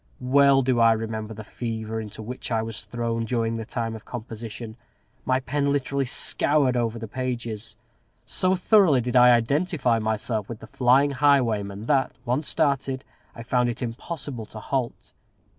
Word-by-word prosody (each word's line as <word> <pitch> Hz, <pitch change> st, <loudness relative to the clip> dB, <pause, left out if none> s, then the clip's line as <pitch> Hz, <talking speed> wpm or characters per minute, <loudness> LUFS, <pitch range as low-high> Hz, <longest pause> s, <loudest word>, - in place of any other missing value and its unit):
Well 135 Hz, +1 st, +4 dB
do 125 Hz, -1 st, +1 dB
I 115 Hz, -1 st, +6 dB
remember 110 Hz, 0 st, -4 dB
the 110 Hz, -, -8 dB
fever 110 Hz, 0 st, -4 dB
into 110 Hz, 0 st, -8 dB
which 125 Hz, +4 st, -6 dB
I 110 Hz, -1 st, +1 dB
was 110 Hz, -1 st, -5 dB
thrown 115 Hz, -1 st, -2 dB
during 115 Hz, -1 st, -1 dB
the 110 Hz, -, -5 dB
time 115 Hz, 0 st, -3 dB
of 110 Hz, -, -10 dB
composition. 115 Hz, -1 st, -7 dB, 0.5 s
My 130 Hz, 0 st, +2 dB
pen 140 Hz, +2 st, -1 dB
literally 140 Hz, -1 st, 0 dB
scoured 135 Hz, +1 st, +2 dB
over 115 Hz, -1 st, 0 dB
the 115 Hz, 0 st, -6 dB
pages. 120 Hz, -2 st, -4 dB, 0.5 s
So 185 Hz, 0 st, +1 dB
thoroughly 185 Hz, -, +4 dB
did 125 Hz, +1 st, -3 dB
I 125 Hz, 0 st, +8 dB
identify 125 Hz, +1 st, +2 dB
myself 110 Hz, -1 st, -2 dB
with 115 Hz, -, -5 dB
the -, -, -10 dB
flying 130 Hz, +5 st, +3 dB
highwayman, 115 Hz, -8 st, +1 dB
that, 135 Hz, 0 st, +1 dB
once 130 Hz, +5 st, 0 dB
started, 135 Hz, -4 st, 0 dB, 0.3 s
I 115 Hz, -, -8 dB
found 125 Hz, 0 st, +1 dB
it 120 Hz, +2 st, -4 dB
impossible 125 Hz, -1 st, -5 dB
to 110 Hz, -, -9 dB
halt. 130 Hz, 0 st, -3 dB
120 Hz, 160 wpm, -25 LUFS, 115-135 Hz, 0.5 s, I